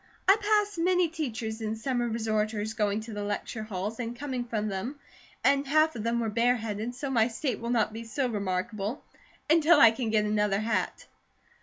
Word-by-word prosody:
I 390 - +8
passed 415 -2 +1
many 360 0 +3
teachers 235 -8 -4
and 220 0 -2
summer 240 0 -1
resorters 220 -1 -1
going 210 0 0
to 220 0 -8
the 205 - -4
lecture 205 +2 -3
halls 215 +1 -4
and 235 0 -4
coming 260 -3 -3
from 215 -3 -2
them, 215 +9 -4 0.4
and 275 0 +3
half 310 +2 +3
of 225 - -4
them 230 +2 0
were 225 -1 -1
bareheaded, 230 0 0
so 275 +1 -4
my 230 -3 +4
state 245 0 -3
will 235 - -4
not 225 -3 +1
be 225 0 -7
remarkable, 210 -1 -2 0.4
until 320 0 +5
I 230 -4 +9
can 230 0 -3
get 215 -1 +2
another 210 -1 +1
hat." 225 +1 -1
230 Hz, 180 wpm, -28 LUFS, 215-270 Hz, 0.4 s, I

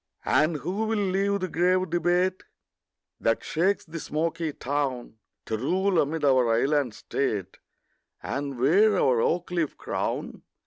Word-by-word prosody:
And 155 +2 +3
who 190 +9 -2
will 220 0 0
leave 200 0 0
the 185 - -1
grave 180 +1 +1
debate 175 +2 +1 0.8
That 115 0 +1
shakes 185 +5 0
the 165 0 -7
smoky 165 +1 -2
town, 135 -5 -3 0.3
To 110 - -3
rule 185 - +1
amid 150 +1 -1
our 130 -4 +4
island 135 -1 +1
state, 105 -7 -3 0.6
And 140 -1 -4
wear 195 - +4
our 125 -3 +3
oak 175 +6 0
leaf 170 -4 -1
crown? - - -3
165 Hz, 135 wpm, -26 LUFS, 140-185 Hz, 0.8 s, our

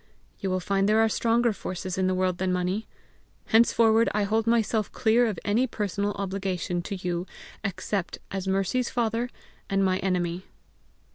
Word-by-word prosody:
You 195 - -2
will 185 0 0
find 195 +2 +1
there 215 - +4
are 225 - +5
stronger 230 +1 +2
forces 185 -1 -5
in 185 0 +1
the 185 - +1
world 185 -1 0
than 190 0 0
money. 180 +4 -1 0.6
Henceforward 225 0 +4
I 210 - +2
hold 220 +2 0
myself 225 -2 +1
clear 235 +1 +3
of 210 -5 -2
any 225 +6 +2
personal 205 -2 -2
obligation 190 -3 -2
to 200 +3 -5
you 180 -1 -3 0.4
except 200 -1 -2
as 190 -1 -3
Mercy's 195 +6 +1
father 235 0 -1 0.4
and 195 0 +2
my 185 0 +1
enemy." 180 -1 -1
195 Hz, 160 wpm, -26 LUFS, 185-225 Hz, 0.6 s, are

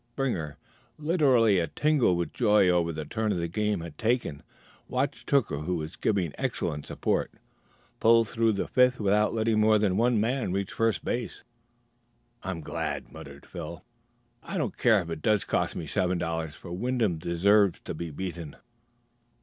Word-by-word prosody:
Springer, 85 - -2 0.4
literally 135 - +3
a 85 - 0
tingle 145 - +2
with 85 0 -3
joy 105 -5 +4
over 85 -1 +2
the 80 -1 -5
turn 110 -3 -1
the 85 0 -1
game 105 +1 -1
had 80 -3 -9
taken, 110 - 0 0.5
watched 135 +2 -2
Hooker, 135 - +2
who 90 +4 -2
was 80 -1 -5
given 95 -8 0
excellent 75 0 -2
support, - - -1 0.7
pull 115 0 +5
through 115 0 +1
the 100 - -2
fifth 125 0 +3
without 105 +1 +2
letting 110 -1 +1
more 110 0 +5
than 100 -3 +1
one 120 0 +3
man 120 -1 0
reach 100 0 -2
first 115 -1 0
base. 120 -1 -3 1.0
"I'm 95 -4 -4
glad," - - -4
muttered 70 0 -11
Phil. - - -8 0.6
"I - - -5
don't - - -2
care 110 -4 +4
if 85 - -8
it 80 -1 -5
does 105 +2 +2
cost - - -1
me - - -4
seven 90 -1 0
dollars, 80 -3 -3
for 85 - -11
Wyndham 110 -3 0
deserves 95 +3 +3
to - - -6
be 85 +1 -5
beaten." 85 -1 -6
100 Hz, 165 wpm, -27 LUFS, 85-115 Hz, 1.0 s, pull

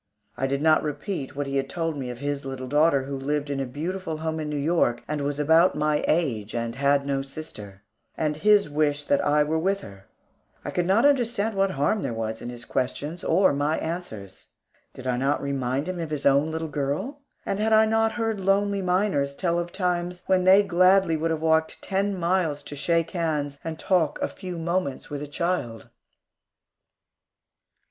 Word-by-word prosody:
I 135 +2 -1
did 140 +2 -1
not 155 -1 +5
repeat 145 0 -4
what 145 0 -2
he 140 0 -2
had 135 0 -1
told 165 -2 -2
me 130 -3 -4
of 125 - -6
his 145 +1 -3
little 135 -1 -5
daughter, 145 0 +3
who 140 +1 -5
lived 145 +2 -2
in 140 - -2
a 135 - -2
beautiful 160 +4 -4
home 160 0 -3
in 155 -1 -3
New 150 - -2
York, 145 -5 +1
and 150 -1 -2
was 145 +1 -2
about 160 +4 +4
my 150 0 +1
age, 120 -11 0
and 115 0 -2
had 140 +2 +2
no 140 -1 0
sister; 105 -9 -9 0.3
and 150 -1 -1
his 210 +2 +4
wish 145 -1 0
that 140 -1 +1
I 150 +1 +3
were 155 +2 0
there - - 0
with 195 +3 0
her. 95 -1 -12 0.6
I - - -3
could 175 -1 -1
not 210 +7 +4
understand 235 -6 +2
what 195 0 +2
harm 185 +7 0
there 115 - -3
was 110 0 -4
in 120 - -6
his 120 0 -9
questions 145 +6 -3
or 185 -1 +3
my 145 +3 0
answers. 110 - -6 0.5
Did 130 - -10
I 125 -1 0
not 135 +3 +1
remind 140 +1 -2
him 185 -1 -3
of 165 -2 -4
his 150 -2 -4
own 140 +2 +4
little 160 0 -3
girl? 150 - -3 0.3
And 195 - -2
had 220 +1 +1
I 220 0 +6
not 225 0 +2
heard 225 -3 -1
lonely 200 +1 +1
miners 180 -7 +1
tell 170 0 0
of 175 0 -4
times 180 -1 -2
when 185 -1 +2
they 190 +2 +7
gladly 185 -1 +4
would 160 +1 -1
have 160 -1 -1
walked 160 0 +2
ten 195 0 -1
miles 170 -4 0
to 145 - -8
shake 165 +3 0
hands 150 -5 -2
and 160 -1 -4
talk 165 -6 +1
a - - 0
few 180 -3 -7
moments 170 -5 -2
with 145 -1 -4
a 150 - -5
child? 145 -8 -3
155 Hz, 200 wpm, -25 LUFS, 140-180 Hz, 0.6 s, they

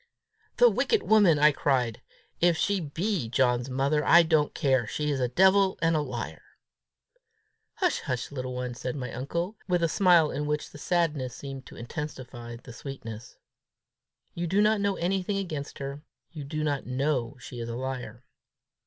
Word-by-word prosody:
"The - - +7
wicked 445 -2 +2
woman!" 205 -8 +5
I 150 +1 +6
cried. 125 -6 0 0.4
"If 170 -1 +3
she 200 +3 +1
be 165 - -2
John's 125 0 +1
mother, 140 +3 +1
I 170 +3 +7
don't 160 -2 +1
care: 130 -7 +2
she's 150 +3 -1
a 125 - +1
devil 190 +7 +4
and 165 0 +2
a 155 - +2
liar!" 130 -5 -5 1.3
"Hush, 370 -6 +1
hush, 125 -2 -3
little 130 -2 -4
one!" 125 -1 -3
said 125 +2 -4
my 125 -3 -5
uncle, 170 - -3
with 180 -2 +1
a - - +4
smile 175 -3 +4
in 150 +2 -3
which 150 0 -2
the 145 - -11
sadness 150 -8 0
seemed 135 -2 -8
to - - -12
intensify 120 -3 -7
the 120 +1 -12
sweetness; 115 -3 -8 1.0
"you 170 0 -3
do 195 +5 +1
not 210 0 +3
know 200 -1 +1
anything 190 +3 -1
against 155 -7 -4
her! 140 +1 -6 0.3
You 150 -4 -7
do 155 +2 -3
not 145 -2 -1
know 130 -2 -1
she 125 -1 -9
is 115 0 -4
a 115 - -4
liar!" 125 -2 -5
145 Hz, 170 wpm, -27 LUFS, 125-170 Hz, 1.3 s, The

